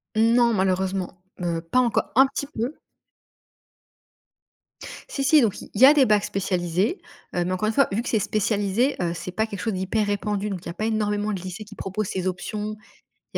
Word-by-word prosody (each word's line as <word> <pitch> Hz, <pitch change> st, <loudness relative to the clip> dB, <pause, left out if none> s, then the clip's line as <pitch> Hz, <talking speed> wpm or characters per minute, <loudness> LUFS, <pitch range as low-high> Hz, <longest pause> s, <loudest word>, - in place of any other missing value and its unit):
Non, 230 Hz, +1 st, +4 dB
malheureusement, 190 Hz, -1 st, 0 dB, 0.2 s
heu, 170 Hz, -1 st, -1 dB
pas 165 Hz, +10 st, +1 dB
encore. 240 Hz, -3 st, +1 dB
Un 265 Hz, +1 st, +7 dB
petit 280 Hz, -, -4 dB
peu. 240 Hz, +7 st, -3 dB, 2.3 s
Si 275 Hz, -, -3 dB
si, 300 Hz, +1 st, +6 dB
donc 210 Hz, -4 st, 0 dB
il -, -, -11 dB
y -, -, +11 dB
a 290 Hz, -, +9 dB
des 280 Hz, -3 st, +5 dB
bacs 210 Hz, -2 st, +3 dB
spécialisés, 185 Hz, -, -1 dB, 0.3 s
heu, 175 Hz, -, +1 dB
mais 185 Hz, -, -2 dB
encore 185 Hz, +4 st, 0 dB
une 220 Hz, -, 0 dB
fois 275 Hz, -, +4 dB
vu 220 Hz, +4 st, 0 dB
que -, -, -5 dB
c'est 220 Hz, -, +2 dB
spécialisé, 210 Hz, +4 st, 0 dB
heu, 170 Hz, -1 st, 0 dB
c'est 175 Hz, +1 st, -6 dB
pas 220 Hz, +4 st, 0 dB
quelque 200 Hz, -3 st, -7 dB
chose 220 Hz, -3 st, -2 dB
d'hyper 190 Hz, +3 st, 0 dB
répandu, 205 Hz, 0 st, -1 dB
donc 190 Hz, -3 st, -4 dB
il -, -, -9 dB
y -, -, -4 dB
a 170 Hz, -, -5 dB
pas 215 Hz, -, -3 dB
énormément 210 Hz, -1 st, 0 dB
de 185 Hz, -, -4 dB
lycées 185 Hz, +3 st, -7 dB
qui 210 Hz, -, -13 dB
proposent 195 Hz, +1 st, -3 dB
ces 185 Hz, 0 st, -2 dB
options. 210 Hz, +4 st, -4 dB, 0.6 s
Il -, -, -7 dB
205 Hz, 205 wpm, -24 LUFS, 185-225 Hz, 2.3 s, y